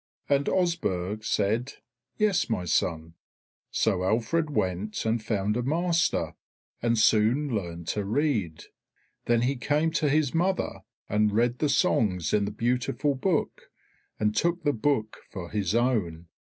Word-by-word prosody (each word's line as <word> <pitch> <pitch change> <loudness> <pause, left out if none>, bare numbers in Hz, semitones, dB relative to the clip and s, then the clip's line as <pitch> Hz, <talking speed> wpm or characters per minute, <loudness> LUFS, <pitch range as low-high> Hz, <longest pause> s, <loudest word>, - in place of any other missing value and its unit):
And 140 0 +2
Osburh 110 - -1
said, 110 +6 0 0.4
"Yes, 205 -8 +2
my 90 -6 -1
son." 80 -1 -1 0.6
So 95 -5 +1
Alfred 120 - +1
went 100 -5 -2
and 110 0 0
found 105 -1 -1
a 125 - 0
master, 165 +5 0 0.5
and 115 0 +1
soon 110 +6 +3
learned 85 -5 -4
to 105 - -1
read. 105 - -1 0.6
Then 120 -1 +2
he 135 +3 +1
came 150 +6 +1
to 155 -2 +1
his 145 -2 +1
mother, 185 +3 0 0.3
and 105 0 +2
read 120 +2 +1
the 150 - +1
songs 95 - +1
in 105 -1 +3
the 100 - -3
beautiful 125 +5 0
book 155 +4 -1 0.5
and 105 0 +1
took 170 +6 0
the 145 -1 +2
book 110 -2 0
for 90 -3 -7
his 105 -1 -1
own. 95 -10 0
115 Hz, 140 wpm, -27 LUFS, 100-145 Hz, 0.6 s, soon